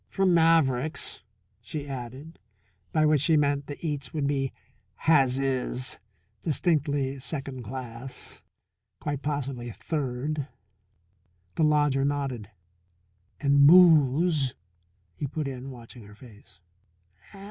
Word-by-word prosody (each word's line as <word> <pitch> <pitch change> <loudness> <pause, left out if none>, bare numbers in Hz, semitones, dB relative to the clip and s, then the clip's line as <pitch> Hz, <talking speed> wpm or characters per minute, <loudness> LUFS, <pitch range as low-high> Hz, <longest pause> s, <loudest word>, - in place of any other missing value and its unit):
"From 195 -2 +2
Maverick's," 160 -4 +2 0.4
she 145 -2 -6
added. 135 +4 -8 0.5
By 155 - +3
which 150 -2 +3
she 155 +1 +3
meant 140 -1 +1
the 145 - -6
eats 145 -3 -3
would 150 -3 -2
be 135 -2 0 0.4
"has 135 -5 +3
is" 130 -1 -2 0.4
distinctly 145 -4 0
second 135 -1 -6
class, 125 +1 -8 0.6
quite 145 -2 -3
possibly 135 -5 -3
third. 140 +2 -3 1.1
The 160 - 0
lodger 145 -3 +3
nodded. 135 -7 -2 0.9
"And 140 0 +5
booze," 155 -4 +5 0.6
he 140 - -4
put 150 +1 -3
in, 130 0 -6
watching 120 -1 -11
her 105 0 -14
face. 110 -6 -16
140 Hz, 105 wpm, -27 LUFS, 130-150 Hz, 1.1 s, And